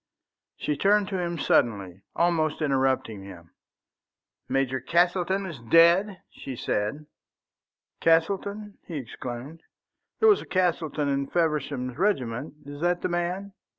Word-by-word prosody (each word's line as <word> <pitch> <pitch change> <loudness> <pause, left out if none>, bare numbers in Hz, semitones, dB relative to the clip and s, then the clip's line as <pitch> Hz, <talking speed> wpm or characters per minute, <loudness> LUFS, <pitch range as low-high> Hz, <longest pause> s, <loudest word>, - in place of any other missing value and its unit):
She 150 - -1
turned 200 +4 +3
to 190 -2 -2
him 170 -1 -2
suddenly, 100 - +1
almost 165 -3 +1
interrupting 130 -6 0
him. 90 -4 -12 1.0
"Major 130 -1 0
Castleton 180 +6 +1
is 165 -8 -7
dead?" 170 - +4
she 135 - -8
said. 110 +7 -2 0.9
"Castleton?" 200 +5 +1
he 170 - -6
exclaimed. 130 +4 -7 0.6
"There 445 - +5
was 415 - +5
a - - -11
Castleton 165 -5 0
in 140 0 0
Feversham's 150 -6 -1
regiment. 140 - -1
Is 145 +1 -9
that 175 0 +1
the - - 0
man?" 180 +3 -2
160 Hz, 120 wpm, -26 LUFS, 130-180 Hz, 1.0 s, There